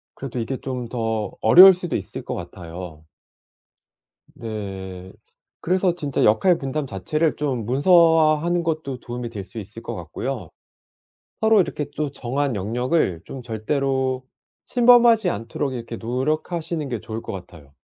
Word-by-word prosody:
그래도 130 -2 -7
이게 125 +3 -3
좀 130 -1 -4
더 110 -3 -2
어려울 185 +11 +9
수도 175 -2 -4
있을 95 - -5
것 - - -4
같아요. 85 -2 -8 1.3
네. 95 -4 -7 0.5
그래서 180 0 +1
진짜 145 -6 -1
역할 170 - +4
분담 140 +2 -3
자체를 155 - -1
좀 130 -7 -2
문서화하는 165 - +4
것도 155 -6 -3
도움이 120 0 -6
될 105 -4 -6
수 110 - -9
있을 110 +3 -9
것 - - -6
같고요. 90 - -5 0.9
서로 220 -2 +5
이렇게 150 -5 -2
또 150 -2 -1
정한 135 0 -2
영역을 115 - 0
좀 130 -2 -8
절대로 130 +3 -1 0.4
침범하지 235 -4 +5
않도록 120 +5 -3
이렇게 115 -1 -6
노력하시는 155 +6 -2
게 120 -4 -3
좋을 110 +1 -6
것 - - -6
같아요. 85 -7 -11
130 Hz, 290 characters per minute, -22 LUFS, 110-155 Hz, 1.3 s, 어려울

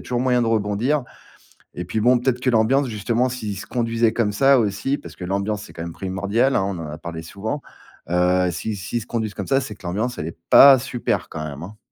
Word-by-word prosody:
toujours 125 -1 -2
moyen 125 -1 +2
de - - 0
rebondir. 115 +6 0 0.7
Et 90 - -5
puis, 90 +5 -2
bon, 125 +3 +4
peut-être 125 0 0
que 130 - -1
l'ambiance 125 +5 +3
justement 115 +3 0
s'ils 110 -6 -5
se - - -8
conduisaient 115 -2 +1
comme 110 -3 0
ça 135 +6 +5
aussi 110 +5 0
parce - - -11
que 90 - -7
l'ambiance 100 +3 -2
c'est - - -13
quand 80 - -6
même 85 0 -6
primordial, 100 +9 0
hein? - - +2
On 95 -2 -3
en 80 - -5
a 75 - -7
parlé 80 -1 -7
souvent. 105 - -5 0.5
Heu, 90 +1 +2
s'ils 105 +5 -4
s'ils 100 +4 -3
se - - -13
conduisent 110 -3 -3
comme - - -5
ça, 135 0 +3
c'est 135 - -6
que 90 - -12
l'ambiance 110 +8 -2
elle 75 - -3
est 85 - -11
pas 135 -1 +9
super, 125 -1 -2
quand 75 - -6
même, 75 0 -7
hein? 105 +4 -10
110 Hz, 235 wpm, -22 LUFS, 95-125 Hz, 0.7 s, pas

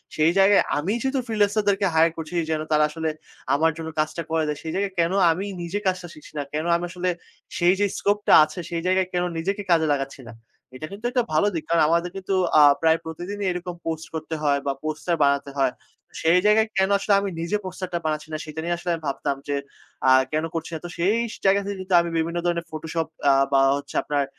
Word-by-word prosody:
সেই 155 +2 +3
জায়গায় 200 +1 +6 0.2
আমিই 195 +10 -1
যেহেতু 265 0 0
freelancer 210 -1 +2
দেরকে 195 0 +2
hire 165 0 +4
করছি 160 +2 -7 0.2
যেন 155 -1 0
তারা 150 0 +4
আসলে 160 0 -3 0.5
আমার 160 +2 +3
জন্য 160 0 -5
কাজটা 155 +2 -1
করে 160 -1 +1
দেয়। 150 -1 -2
সেই 160 - -4
জায়গায় 195 0 -1
কেনো 170 +3 +2 0.2
আমি 190 +5 -2 0.2
নিজে 175 +4 -3
কাজটা 180 -1 -1
শিখছি 150 - -15
না? 145 - -1
কেনো 155 +3 -2
আমি 170 - -1
আসলে 180 0 -2 0.5
সেই 175 +2 +4
যে 205 - +4
scope 205 +1 +1
টা - - +4
আছে, 155 +3 -9
সেই 165 -1 -2
জায়গায় 185 0 +2
কেনো 180 0 0
নিজেকে 195 +5 -2
কাজে 160 -2 +4
লাগাচ্ছি 135 0 -4
না?" 115 - -9 0.4
এটা 155 - -6
কিন্তু 210 +4 -9
একটা 245 -2 +2
ভালো 180 +7 +3
দিক। 165 - -3
কারণ 170 -1 +3
আমাদের 170 +1 +1
কিন্তু 195 +1 -3 0.3
আ - - +8 0.2
প্রায় 160 0 +4
প্রতিদিনই 185 +5 -5
এরকম 180 0 -5
post 160 -1 -3
করতে 160 0 -4
হয় 140 -1 +2
বা 140 - +1
poster 155 +3 -1
বানাতে 140 0 +1
হয়। 135 -2 +2 0.5
সেই 170 +3 +4
জায়গায় 220 +1 +4
কেনো 190 +1 +3
আসলে 200 +1 +1
আমি 200 0 -2
নিজে 170 +5 -1
poster 185 0 -5
টা - - +1
বানাচ্ছি 155 0 -2
না, - - -1
সেটা 155 +1 -7
নিয়ে 175 0 0
আসলে 175 0 -5
আমি 160 - -10
ভাবতাম 140 0 -1
যে 145 - -1 0.5
আ - - +7 0.2
কেন 155 +1 0
করছি 165 - -4
না? 160 - -3
তো - - -5
সেই 190 +6 +2 0.3
জায়গা 195 +1 +5
থেকে 200 -1 -4
কিন্তু 185 0 -4
আমি 170 - -3
বিভিন্ন 170 +1 -1
ধরনের 170 -1 0
Photoshop 160 +1 -3 0.2
আ - - +5 0.2
বা 135 - +5 0.2
হচ্ছে 145 0 -9
আপনার 145 -1 0
170 Hz, 225 wpm, -24 LUFS, 155-190 Hz, 0.5 s, আ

